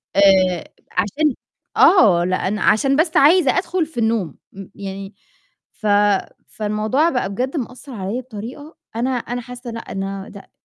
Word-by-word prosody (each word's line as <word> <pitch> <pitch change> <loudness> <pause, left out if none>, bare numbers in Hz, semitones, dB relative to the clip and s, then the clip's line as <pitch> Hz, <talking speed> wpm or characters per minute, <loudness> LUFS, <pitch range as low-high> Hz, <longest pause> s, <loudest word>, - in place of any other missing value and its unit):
آآ، 190 -3 +4 0.3
عشان 290 +7 0 0.4
آه، 195 - +6
لأن 185 +3 -1
عشان 270 +7 +3
بس 320 +2 +2
عايزة 305 0 +5
أدخل 360 -2 0
في 300 -6 -7
النوم، 220 -9 0 0.2
م 195 0 -9
يعني، 195 0 -7 0.6
ف 215 - -5 0.6
فالموضوع 215 +9 0
بقى 250 -9 -1
بجد 255 +9 -3
مأثّر 255 +2 -6
عليَّ 210 +3 -3
بطريقة، 255 +6 -9 0.2
أنا 240 +3 0
أنا 245 0 -3
حاسّة 245 0 -9
لأ، 230 - -5
إن 195 0 -3
أنا 195 0 -6
لأ، 200 -1 -13
230 Hz, 145 wpm, -20 LUFS, 195-270 Hz, 0.6 s, آه